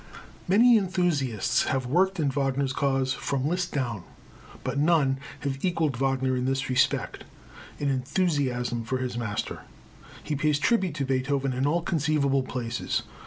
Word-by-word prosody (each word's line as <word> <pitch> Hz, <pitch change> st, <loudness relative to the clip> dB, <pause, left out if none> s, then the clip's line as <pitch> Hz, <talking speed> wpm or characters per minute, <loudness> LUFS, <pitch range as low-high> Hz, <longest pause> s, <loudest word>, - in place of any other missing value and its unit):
Many 230 Hz, +6 st, +6 dB
enthusiasts 175 Hz, -, 0 dB
have 135 Hz, -2 st, -1 dB
worked 185 Hz, +8 st, +2 dB
in 145 Hz, -3 st, +1 dB
Wagner's 135 Hz, -1 st, 0 dB
cause 135 Hz, -2 st, +1 dB
from 140 Hz, 0 st, -2 dB
Liszt 180 Hz, +2 st, -1 dB
down, 120 Hz, -9 st, -2 dB, 0.6 s
but 140 Hz, -, -2 dB
none 145 Hz, -4 st, +3 dB, 0.2 s
have 135 Hz, -1 st, -3 dB
equalled 165 Hz, -6 st, +1 dB
Wagner 130 Hz, 0 st, 0 dB
in 125 Hz, 0 st, -1 dB
this 135 Hz, +1 st, -1 dB
respect 125 Hz, -, +1 dB, 0.5 s
in 145 Hz, -, -2 dB
enthusiasm 130 Hz, -4 st, 0 dB
for 130 Hz, +4 st, -2 dB
his 125 Hz, -2 st, -3 dB
master. 110 Hz, -4 st, -3 dB, 0.6 s
He 150 Hz, -, -2 dB
pays 150 Hz, 0 st, +2 dB
tribute 185 Hz, -1 st, +1 dB
to 140 Hz, -2 st, -1 dB
Beethoven 135 Hz, +1 st, 0 dB
in 130 Hz, +3 st, 0 dB
all 170 Hz, +3 st, +1 dB
conceivable 145 Hz, -4 st, +1 dB
places. 125 Hz, -2 st, -3 dB
135 Hz, 145 wpm, -26 LUFS, 130-155 Hz, 0.6 s, Many